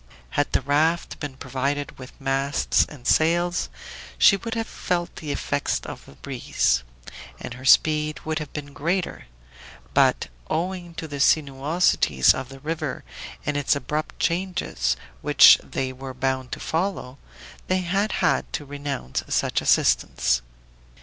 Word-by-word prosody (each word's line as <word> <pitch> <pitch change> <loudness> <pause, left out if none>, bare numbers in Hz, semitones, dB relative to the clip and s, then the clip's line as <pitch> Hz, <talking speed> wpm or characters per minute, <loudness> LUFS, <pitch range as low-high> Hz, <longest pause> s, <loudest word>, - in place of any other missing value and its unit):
Had - - 0
the - - +2
raft 155 +4 +1
been 140 -3 -6
provided 135 +2 -3
with 130 +2 -12
masts 135 +1 +1
and 135 -5 -13
sails 175 +5 +2 0.5
she - - +7
would 230 +4 -5
have 225 0 -1
felt 175 -4 -3
the 150 -2 -5
effects 145 0 -1
of - - -9
the - - -13
breeze, 95 - 0 0.6
and - - -6
her 130 +2 -11
speed 150 +2 +4
would 155 0 -2
have 150 -2 -7
been 145 -1 -7
greater; 170 - -2 0.7
but - - +3 0.2
owing 175 0 -3
to 160 - -5
the 145 -2 -6
sinuosities 140 - +3
of 130 -1 -6
the 135 0 -11
river 155 -2 -3 0.4
and 150 - -1
its 145 0 +2
abrupt 150 +3 -3
changes, 170 - -1 0.2
which - - +8
they 130 -1 -3
were 130 0 -8
bound 130 -1 -2
to - - -5
follow, 160 -6 -2 0.5
they 185 0 +1
had 195 +4 0
had - - +1
to 145 - -3
renounce 140 - -4
such - - +1
assistance. - - +2
145 Hz, 145 wpm, -24 LUFS, 130-165 Hz, 0.7 s, which